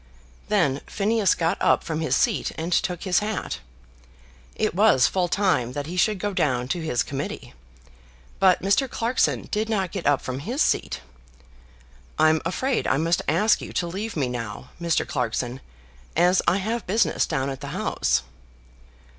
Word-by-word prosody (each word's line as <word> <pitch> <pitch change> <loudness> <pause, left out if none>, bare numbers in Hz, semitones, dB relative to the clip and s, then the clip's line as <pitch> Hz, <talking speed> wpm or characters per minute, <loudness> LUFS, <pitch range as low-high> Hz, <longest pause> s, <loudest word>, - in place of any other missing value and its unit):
Then 155 -10 +1
Phineas 210 -1 +2
got 165 0 0
up - - +3
from 160 -1 -3
his 160 - +1
seat - - +1
and 165 +2 -2
took 180 -2 0
his 185 -3 +2
hat. 210 - -3 1.0
It 215 - 0
was 185 - +5
full 185 -2 +1
time 175 - +1
that 145 +1 -4
he 170 +4 -6
should 210 +3 +2
go 205 +2 -3
down 125 -8 0
to 175 - -1
his 140 -7 0
Committee. 140 +1 -5 0.9
But 185 -2 +4
Mr. 205 +8 +2
Clarkson 235 +2 0
did 215 +1 -1
not 195 -5 0
get 190 -7 -3
up 145 -1 +3
from 130 0 -4
his 240 - -4
seat. - - 0 1.2
"I'm 155 0 +4
afraid 255 +10 0
I - - +2
must 165 +3 +1
ask 195 +8 +3
you - - -7
to 175 - 0
leave 195 +4 -4
me 135 -4 +1
now, 120 0 -6
Mr. 170 -2 +1
Clarkson, 125 0 -2 0.5
as 180 +3 +4
I 185 - +4
have 220 +4 -3
business 215 +5 +2
down 135 0 -1
at 135 - -7
the - - -6
House." - - 0
175 Hz, 165 wpm, -24 LUFS, 140-205 Hz, 1.2 s, was